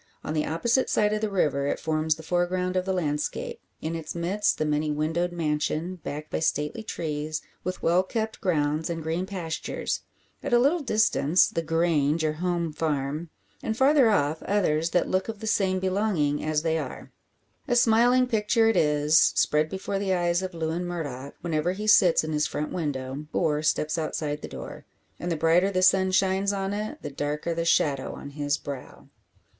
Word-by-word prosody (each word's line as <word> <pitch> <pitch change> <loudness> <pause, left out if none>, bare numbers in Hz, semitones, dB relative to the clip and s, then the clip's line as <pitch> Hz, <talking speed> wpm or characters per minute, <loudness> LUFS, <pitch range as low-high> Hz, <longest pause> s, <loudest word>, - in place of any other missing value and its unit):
On 155 - -3
the 155 -1 0
opposite 230 +11 +1
side 210 0 +2
of 215 - -1
the 215 - 0
river 145 -8 +1
it - - -1
forms 155 -1 0
the 160 - -11
foreground 180 +2 0
of 185 0 0
the 190 - -1
landscape; 180 - -2 0.2
in 160 +1 -2
its 160 0 -6
midst 185 +5 0
the 155 - 0
many 150 0 0
windowed 160 +4 0
mansion, 160 +2 -1
backed 150 +1 -6
by - - -1
stately 150 +5 -1
trees, 155 -6 -4 0.2
with 185 +1 -4
well 175 +2 +4
kept 220 +3 -4
grounds, 155 -4 0
and 165 -1 -3
green 165 +4 -2
pastures; 170 -5 -3 0.4
at - - -3
a - - +7
little 280 +8 +3
distance 215 - +3
the 165 - -2
"Grange," 165 -1 +1
or 155 - +1
home 170 -1 -2
farm, 150 +1 -2 0.3
and 220 0 -3
farther 270 -2 +5
off 155 -6 +1
others 170 -5 +1
that 175 - +1
look 190 +3 0
of 225 - -4
the 220 - -6
same 190 -3 +1
belonging 185 -6 0
as 155 0 0
they 160 -1 +1
are. - - -7 0.6
A 245 - +1
smiling 240 +2 +5
picture 225 -1 +2
it 225 - +3
is; 150 +1 +4 0.2
spread 150 +1 +2
before 195 +2 -3
the 195 -2 +1
eyes 175 0 +1
of 185 -2 -5
Lewin 165 +2 -2
Murdock, 145 -6 -5
whenever 170 +1 0
he 210 +3 -5
sits 180 -6 +5
in 155 0 -3
his 150 0 +1
front 150 +1 -4
window, 145 -3 -3
or 150 -1 +1
steps 155 +1 0
outside 150 -1 -3
the - - -6
door. - - -8 0.4
And 175 - -3
the 165 - 0
brighter 165 +5 +3
the 185 -2 0
sun 190 0 +5
shines 190 +1 +2
on 195 0 -2
it, 215 +9 -5
the - - -5
darker 150 +4 -2
the 165 0 -2
shadow 140 -5 +1
on 140 - -9
his 145 0 -1
brow! 140 -2 -9
170 Hz, 190 wpm, -26 LUFS, 150-195 Hz, 0.6 s, a